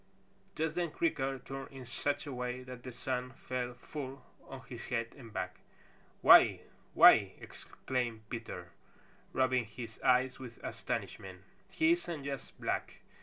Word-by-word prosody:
Just 160 0 0
then 175 0 0
Creaker 135 - 0
turned 135 +1 -7
in 135 -2 -9
such 145 +3 -2
a 145 - -5
way 125 0 -3
that 125 -1 -9
the 125 - -7
sun 125 +1 -3
fell 125 0 -4
full 135 +1 -7 0.2
on 135 -1 -8
his 120 -2 -9
head 115 -2 -2
and 120 -5 -11
back. 90 -3 -4 0.7
"Why! - - +8 0.3
Why - - +11
ee!" - - -1
exclaimed 120 -4 -4
Peter, 105 -7 -6 0.6
rubbing 130 -2 +2
his 115 +1 -9
eyes 130 +1 +3
with 125 -3 -9
astonishment. 95 -1 -4 0.3
"He 320 +1 +3
isn't 170 - -1
just 140 -1 -6
black! - - -2
125 Hz, 145 wpm, -33 LUFS, 120-135 Hz, 0.7 s, Why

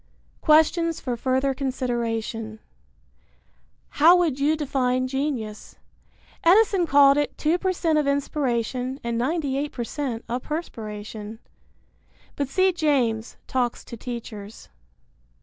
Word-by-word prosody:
Questions 330 +1 +3
for 250 -2 -3
Further 260 +3 0
Consideration. 235 -4 -3 1.3
How 330 +5 +6
would 330 -7 +1
you 300 +3 +2
define 255 -3 0
genius? 255 -6 -4 0.7
Edison 380 0 +4
called 280 -1 +6
it 290 -1 -1
2% 340 -1 +1
of 295 - 0
inspiration 260 -2 -1
and 235 0 -1
98% 275 -4 -2
of 245 +2 -2
perspiration. 215 -8 -6 1.0
(But 280 - -1
see 375 +7 +2
James, 255 -9 0
Talks 245 -2 -1
to - - -8
Teachers.) 225 -3 -8
265 Hz, 95 wpm, -24 LUFS, 235-305 Hz, 1.3 s, How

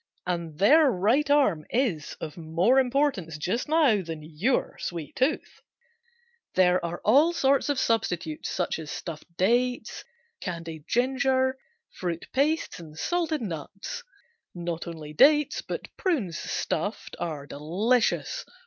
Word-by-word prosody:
And 170 -4 -3
their 295 - +6
right 240 +8 +2
arm 265 - +3
is 220 - -1
of 155 - -6
more 170 +10 +2
importance 255 - 0
just 195 - -2
now 295 -10 +4
than 165 -3 -7
your 165 - 0
sweet 160 -4 -5
tooth. 265 +5 -1 0.9
There 180 -1 +4
are 170 0 -4
all 290 +10 +5
sorts 275 -2 +2
of 285 -2 +1
substitutes 175 -10 -1
such 175 -2 -1
as 155 -2 -7
stuffed 160 -2 -6
dates, 240 +4 +1 0.4
candied 165 -4 -6
ginger, 260 +1 +2 0.4
fruit 170 -2 -4
pastes 300 - +1
and 155 -2 -11
salted 325 - -1
nuts. 195 - -6 0.5
Not 170 -1 -4
only 155 -3 -7
dates, 295 - +5
but - - -7
prunes, 260 - 0
stuffed, - - -3
are 150 -4 -4
delicious. 215 - 0
200 Hz, 125 wpm, -27 LUFS, 165-270 Hz, 0.9 s, their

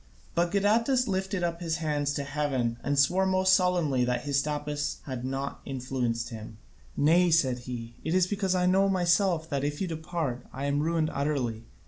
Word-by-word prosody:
But 170 +1 +1
Gadatas 230 +6 +2
lifted 190 -1 -1
up 170 0 -2
his 165 -2 -1
hands 145 -3 -1
to 140 - -2
heaven 135 -5 -1
and 145 0 0
swore 180 +7 +3
most 185 0 +3
solemnly 175 -9 +2
that 125 0 -1
Hystaspas 145 +1 -1
had 130 -3 -5
not 135 +2 -3
influenced 125 -3 -2
him. 110 -2 -9 0.4
"Nay," 170 +4 +4
said 135 -7 +2
he, 120 -1 -6
"it 160 - -1
is 185 -1 +4
because 195 -1 -1
I 180 0 +2
know 190 +2 +3
myself 175 -2 +2
that, 140 -1 -1
if 145 0 -2
you 190 - -1
depart, 160 -6 -4
I 135 +2 -5
am 140 0 +1
ruined 160 0 0
utterly. 130 -6 -2
150 Hz, 175 wpm, -28 LUFS, 135-180 Hz, 0.4 s, Nay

